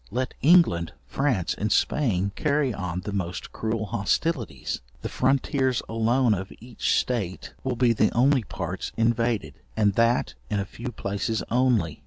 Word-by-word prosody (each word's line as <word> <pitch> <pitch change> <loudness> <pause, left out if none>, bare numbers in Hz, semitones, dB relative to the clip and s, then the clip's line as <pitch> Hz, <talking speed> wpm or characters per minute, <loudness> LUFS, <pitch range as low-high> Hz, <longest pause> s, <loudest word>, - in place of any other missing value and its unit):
Let 125 +4 -2
England, 140 - +4
France, 130 -11 0
and 105 +1 -2
Spain 100 -9 +1
carry 145 -4 +1
on 90 -3 -3
the 105 - -5
most 90 -3 -4
cruel 110 -1 -2
hostilities, 115 - -1 0.2
the - - -2
frontiers 130 -2 +1
alone 115 +2 +2
of 95 -1 -4
each 120 +1 -1
state 100 -8 -2
will 130 -2 -1
be 120 -1 +3
the 110 -1 +2
only 130 +2 +3
parts - - -5
invaded, 115 -1 0 0.2
and 105 -2 +3
that 115 +3 +2 0.2
in 105 - 0
a 100 - -1
few 120 +5 -7
places 105 +1 -2
only. 120 - +2
115 Hz, 150 wpm, -25 LUFS, 100-130 Hz, 0.2 s, England